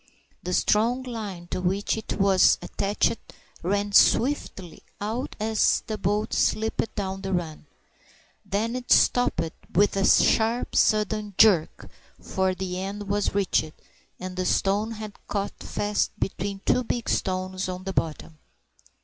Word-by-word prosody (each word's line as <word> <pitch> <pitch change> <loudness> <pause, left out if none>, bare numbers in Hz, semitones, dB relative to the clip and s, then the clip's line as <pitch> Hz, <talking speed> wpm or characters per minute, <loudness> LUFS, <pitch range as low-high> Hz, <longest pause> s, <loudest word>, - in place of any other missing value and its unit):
The 180 - -4
strong 235 +5 +2
line 210 -8 -6
to - - -2
which 190 +3 0
it 220 - -4
was 195 -2 +5
attached 205 +3 0 0.4
ran 205 +3 -1
swiftly 200 - +2 0.2
out 225 +6 -4
as 220 0 +2
the 220 - -3
boat 210 +2 -1
slipped 220 +1 0
down 195 -2 -3
the 195 0 -4
run. 160 -4 -3 0.8
Then 210 +4 -2
it 250 -1 -6
stopped 245 0 +4 0.4
with 205 +3 +3
a 195 - +1
sharp 225 +4 +3
sudden 210 -1 +1
jerk, 195 -8 +4 0.3
for 190 -1 -1
the 185 0 -4
end 200 +1 -5
was 205 -1 0
reached, 180 -5 +1 0.5
and 185 0 -6
the 185 0 -2
stone 205 +3 +1
had 215 -2 -8
caught 200 -1 -3
fast 205 0 -2
between 195 +1 -3
the 250 - +2
big 240 0 -3
stones 185 0 -1
on 185 0 -5
the 195 0 -4
bottom. 155 -1 -3
200 Hz, 140 wpm, -25 LUFS, 185-215 Hz, 0.8 s, was